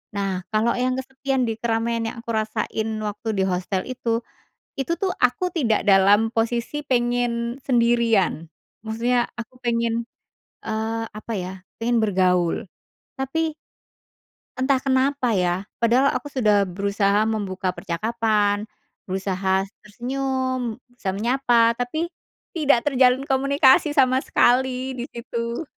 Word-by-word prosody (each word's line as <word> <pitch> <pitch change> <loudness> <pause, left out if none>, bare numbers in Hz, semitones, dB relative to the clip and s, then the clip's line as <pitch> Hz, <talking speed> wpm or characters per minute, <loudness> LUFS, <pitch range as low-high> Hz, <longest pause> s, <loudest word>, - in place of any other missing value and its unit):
Nah, 195 -2 -1
kalo 220 +2 +2
yang 255 +1 0
kesepian 265 0 -2
di 225 0 -3
keramaian 230 0 0
yang - - -12
aku 235 - -4
rasain 220 0 -2 0.2
waktu 210 +2 -5
di 190 - +1
hostel 185 0 -1
itu. 235 -2 -2 0.6
Itu 335 +6 0
tuh, 380 -2 0
aku 250 +9 +1
tidak 230 -11 +1
dalam 200 +3 +5
posisi 235 +6 -1
pengen 240 -2 0
sendirian. 235 - +2 0.4
Maksudnya 235 +2 0
aku 235 +2 -8
pengen, 235 -1 0 0.6
eee, 225 +1 -2
apa 215 +2 -7
ya, 185 -1 -4 0.3
pengen 240 0 +2
bergaul. 180 -3 +1 0.5
Tapi, 315 +4 -1 1.0
entah 260 +1 +2
kenapa 265 -2 +1
ya, 180 0 0 0.2
padahal 245 +4 +4
aku 290 - -4
sudah 210 -7 +3
berusaha 200 +2 +1
membuka 195 -4 -2
percakapan, 210 +2 0 0.4
berusaha 190 0 0 0.2
tersenyum, 255 +1 -2 0.2
berusaha 195 -6 -3
menyapa. 235 0 +3
Tapi, 245 +8 -2 0.5
tidak 290 -7 +2
terjalin 260 -2 +3
komunikasi 275 +1 +3
sama 260 -1 +4
sekali, 260 0 +2
di 250 -1 -5
situ. 235 +1 -4
235 Hz, 120 wpm, -23 LUFS, 210-260 Hz, 1.0 s, dalam